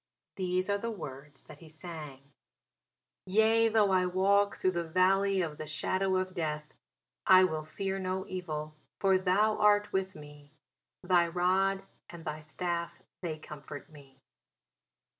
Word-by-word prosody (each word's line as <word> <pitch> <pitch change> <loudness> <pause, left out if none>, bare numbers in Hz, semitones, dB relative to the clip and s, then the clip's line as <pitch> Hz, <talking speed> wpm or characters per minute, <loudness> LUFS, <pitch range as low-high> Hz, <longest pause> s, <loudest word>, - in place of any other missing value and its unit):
These 185 -1 -1
were 200 0 +1
the 230 - -3
words 145 -8 -8
that 150 -1 -13
he 165 - -14
sang: 155 -4 -9 1.0
Yea 220 +3 +4
though 215 -3 +3
I 185 -1 +3
walk 200 +2 +3
through 185 - +1
the 170 -1 -2
valley 190 +3 +2
of 155 -3 -5
the 155 - -5
shadow 185 +5 0
of 185 0 -1
death, 150 -4 -3 0.5
I 185 0 +8
will 160 -4 0
fear 195 +5 -3
no 190 0 -2
evil; 155 -5 -5 0.3
for 190 -1 +4
thou 200 +4 +2
art 210 0 +4
with 190 0 -1
me; 145 -1 -13 0.5
Thy 180 -1 +4
rod 190 +3 +1 0.3
and 170 -1 -10
thy 155 0 -4
staff, 170 +2 -4 0.2
they 165 -4 -3
comfort 150 0 -10
me. 140 -3 -16
180 Hz, 145 wpm, -31 LUFS, 155-195 Hz, 1.0 s, I